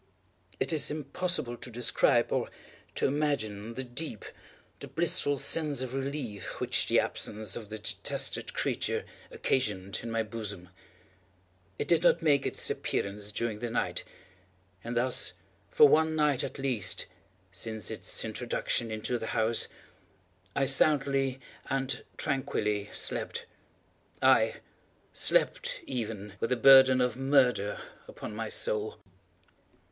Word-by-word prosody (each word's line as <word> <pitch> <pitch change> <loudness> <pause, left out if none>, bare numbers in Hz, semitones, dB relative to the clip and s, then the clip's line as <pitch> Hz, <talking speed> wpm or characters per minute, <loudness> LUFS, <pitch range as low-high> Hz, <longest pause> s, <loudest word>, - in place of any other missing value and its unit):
It - - 0
is 150 -2 +1
impossible 155 -3 -2
to 125 - -10
describe, 120 0 +2
or - - 0 0.5
to - - 0
imagine, 115 -7 -1
the 130 - -4
deep, 125 -2 -5 0.5
the - - -8
blissful 145 0 +2
sense 145 -2 +1
of 130 -1 -6
relief 135 -8 -5
which - - 0
the - - +4
absence 110 -1 -2
of 110 -3 -7
the 110 - -5
detested 105 - 0
creature - - -1 0.2
occasioned 100 -7 -1
in 115 - -6
my 115 0 0
bosom. 105 -5 -5 1.1
It - - -3
did 170 -2 +3
not 170 -1 +3
make 145 -3 +3
its - - +2
appearance 100 +1 -2
during 110 0 -2
the 120 +1 -3
night; 115 - -2 0.8
and 120 +1 -5
thus 125 +1 +2 0.4
for 150 - +7
one 160 +2 +3
night 150 -4 +2
at - - -5
least, 125 -9 0 0.5
since 110 +2 -4
its - - -1
introduction 115 - -1
into 110 +3 -2
the 110 - -5
house, 110 +1 +1 0.9
I 135 - +2
soundly 135 -1 +3 0.3
and 135 0 -2
tranquilly 105 -7 -1
slept; - - -1 0.7
aye, - - +4 0.6
slept - - +2
even 110 -5 -5
with 115 - -1
the 125 - +2
burden 130 +1 +7
of 125 -1 +1
murder 130 -6 +2 0.3
upon - - -8
my 110 0 -4
soul! 105 0 -1
125 Hz, 130 wpm, -29 LUFS, 110-140 Hz, 1.1 s, for